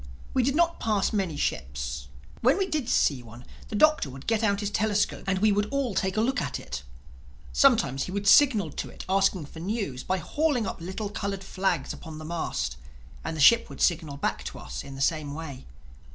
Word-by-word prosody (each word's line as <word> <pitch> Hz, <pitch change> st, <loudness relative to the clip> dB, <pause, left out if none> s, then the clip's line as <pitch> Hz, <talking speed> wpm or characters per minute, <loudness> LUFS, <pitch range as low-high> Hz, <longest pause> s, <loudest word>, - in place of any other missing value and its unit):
We 260 Hz, -, +3 dB
did 270 Hz, +3 st, +1 dB
not 335 Hz, +1 st, +2 dB
pass 210 Hz, -3 st, +1 dB
many 190 Hz, -7 st, -1 dB
ships. 65 Hz, -, -3 dB, 0.3 s
When 255 Hz, +7 st, +4 dB
we 390 Hz, -, +1 dB
did 305 Hz, -9 st, -2 dB
see 140 Hz, -, +2 dB
one, 120 Hz, +1 st, -13 dB, 0.2 s
the -, -, -5 dB
Doctor 305 Hz, -, +4 dB
would 135 Hz, +1 st, -10 dB
get 225 Hz, -1 st, +1 dB
out 200 Hz, -1 st, +2 dB
his 205 Hz, 0 st, -2 dB
telescope 210 Hz, -1 st, 0 dB
and 195 Hz, -1 st, +1 dB
we 210 Hz, +2 st, +4 dB
would 205 Hz, +1 st, +1 dB
all 275 Hz, -5 st, -1 dB
take 190 Hz, +1 st, -1 dB
a -, -, +4 dB
look 260 Hz, +4 st, +1 dB
at -, -, -3 dB
it. -, -, -6 dB, 0.7 s
Sometimes 130 Hz, -, +4 dB
he -, -, -7 dB
would 200 Hz, +1 st, -2 dB
signal 215 Hz, -, +6 dB
to -, -, -5 dB
it, -, -, -9 dB
asking 190 Hz, -3 st, +2 dB
for 160 Hz, -, -11 dB
news, 180 Hz, -, -3 dB
by 185 Hz, -, 0 dB
hauling 275 Hz, -, 0 dB
up 190 Hz, -, -5 dB
little 190 Hz, +4 st, -4 dB
colored 200 Hz, -2 st, -3 dB
flags 185 Hz, -7 st, -1 dB
upon 160 Hz, -1 st, -9 dB
the 155 Hz, -, -8 dB
mast; 170 Hz, +1 st, -3 dB, 0.5 s
and 160 Hz, -, -4 dB
the -, -, -1 dB
ship 230 Hz, +10 st, +6 dB
would -, -, -10 dB
signal 155 Hz, -5 st, +1 dB
back -, -, -2 dB
to -, -, -6 dB
us -, -, -6 dB
in 140 Hz, -1 st, -9 dB
the 135 Hz, -, -6 dB
same 145 Hz, 0 st, 0 dB
way. 150 Hz, -, -8 dB
195 Hz, 210 wpm, -27 LUFS, 150-220 Hz, 0.7 s, signal